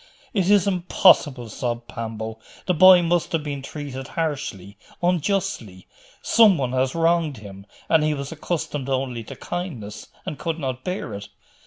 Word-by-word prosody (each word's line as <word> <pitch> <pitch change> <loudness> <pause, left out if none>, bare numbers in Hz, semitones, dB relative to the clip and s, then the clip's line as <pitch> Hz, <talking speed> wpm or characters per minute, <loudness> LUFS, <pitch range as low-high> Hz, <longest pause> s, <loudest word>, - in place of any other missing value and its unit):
'It 190 -4 +1
is 205 -3 +5
impossible!' 175 -8 +3
sobbed 120 +2 -4
Pambo. 110 -1 -6 0.3
'The 180 - +2
boy 180 +1 +8
must 170 0 0
have 160 -2 0
been 145 -2 -4
treated 135 -2 -7
harshly, 135 - -4 0.3
unjustly? 175 - -1 0.4
Some 215 -6 +5
one 130 -3 -1
has 130 +2 0
wronged 165 -4 +1
him, 100 -1 -11 0.2
and 160 -2 +4
he 155 0 +1
was 140 0 -6
accustomed 150 -4 -3
only 130 -3 -2
to - - -9
kindness, 130 - -6 0.2
and 150 - -5
could 165 -1 -2
not 130 -4 -4
bear 185 +2 -4
it. 100 0 -7
145 Hz, 155 wpm, -23 LUFS, 120-175 Hz, 0.4 s, boy